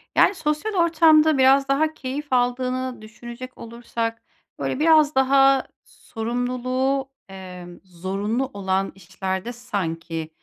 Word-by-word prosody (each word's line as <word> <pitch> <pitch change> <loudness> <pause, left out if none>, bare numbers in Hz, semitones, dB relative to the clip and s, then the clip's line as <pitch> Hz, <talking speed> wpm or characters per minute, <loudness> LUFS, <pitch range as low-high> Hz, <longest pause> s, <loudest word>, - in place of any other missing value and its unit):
Yani 400 - +5
sosyal 310 +6 -2
ortamda 315 -3 +4
biraz 270 +1 +5
daha 305 +3 +1
keyif 280 +1 -5
aldığını 255 0 0
düşünecek 240 +3 -10
olursak 230 0 -5 0.4
böyle 260 - -2
biraz 310 -2 +4
daha 270 0 +4 0.2
sorumluluğu, 255 +3 -2 0.2
emm, 180 -2 -10
zorunlu 195 +7 -3
olan 195 0 -1
işlerde 190 +3 -4
sanki, 165 -8 -4
250 Hz, 105 wpm, -23 LUFS, 195-275 Hz, 0.4 s, Yani